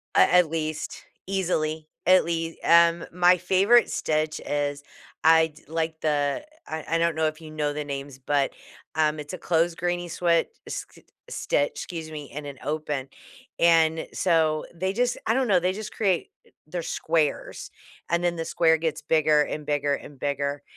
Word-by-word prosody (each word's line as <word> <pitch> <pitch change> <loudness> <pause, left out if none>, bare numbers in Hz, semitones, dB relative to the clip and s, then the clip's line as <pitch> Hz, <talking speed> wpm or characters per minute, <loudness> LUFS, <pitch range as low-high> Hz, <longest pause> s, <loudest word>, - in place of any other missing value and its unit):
At - - +6
at 180 -3 +5
least, 155 -1 -4 0.2
easily. 160 -5 -1 0.2
At 185 +1 +6
lea 165 -1 -3
Um, 170 0 +5
my 180 +1 +5
favorite 195 +7 +4
stitch 155 0 -1
is 145 -1 -2 0.4
I'd 160 -2 +3
like 160 0 -2
the 145 - 0 0.2
I 160 0 -5
I - - +4
don't 170 0 +2
know 160 - +1
if 155 +1 -5
you 155 -1 -10
know 150 -1 -1
the 150 0 -3
names, 140 -1 -6
but, 140 +1 0 0.4
um, 155 -1 +1
it's 150 +3 -7
a - - -4
closed 165 0 +1
granny 175 0 -1
sweat 170 0 +1 0.2
s - - -5
s - - -18 0.3
stitch, 145 0 0
excuse 165 -3 -7
me, 150 -2 -8
and 145 +1 -6
an 140 -2 -8
open. 150 -3 -3 0.5
And, 165 -1 +4
so, 160 -4 +2
they 190 +3 -2
just 245 +2 0
I 225 - +3
don't 265 0 +1
know, 190 -4 +4
they 180 +2 0
just 215 +1 -7
create 190 -6 0 0.4
they're 170 +2 -4
squares, 160 -2 -1 0.4
and 170 +1 +1
then 175 -1 +1
the 165 - -3
square 160 -1 +3
gets 160 -1 -2
bigger 155 -1 +3
and 150 0 -3
bigger 145 -1 0
and 140 0 -11
bigger. 140 0 -2
160 Hz, 175 wpm, -25 LUFS, 150-175 Hz, 0.5 s, At